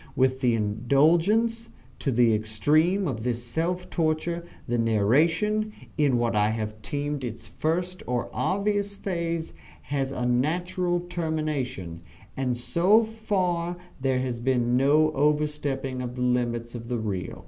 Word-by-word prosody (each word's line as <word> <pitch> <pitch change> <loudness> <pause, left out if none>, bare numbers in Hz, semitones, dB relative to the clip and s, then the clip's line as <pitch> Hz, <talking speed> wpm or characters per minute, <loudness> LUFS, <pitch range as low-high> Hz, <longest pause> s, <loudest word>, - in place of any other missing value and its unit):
With 130 0 +2
the 125 -3 +2
indulgence, 165 - +2 0.3
to 140 - 0
the 120 -2 +4
extreme, 150 - +2
of 115 -6 -3
this 120 -1 -1
self 170 +8 -2
torture, 170 +1 0 0.2
the 120 0 0
narration, 160 - +2 0.2
in 145 -5 +3
what 120 -1 0
I 105 0 +3
have 110 -1 -4
termed 145 +5 -3
its 115 -2 -6
first 180 +3 -2
or 125 -1 -1
obvious 200 +1 0
phase, 170 -4 -3 0.3
has 135 -2 -2
a 125 -2 -2
natural 175 +8 0
termination, 155 - -3 0.3
and 125 -2 -1
so 185 - +4
far 185 -6 -1 0.2
there 130 -1 +1
has 125 -2 -2
been 120 -1 +1
no 150 +4 +4
overstepping 145 -3 0
of 125 0 -5
the 125 - -2
limits 120 -1 0
of 115 -1 -7
the 120 0 -1
real. 100 -5 -4
140 Hz, 135 wpm, -26 LUFS, 120-170 Hz, 0.3 s, the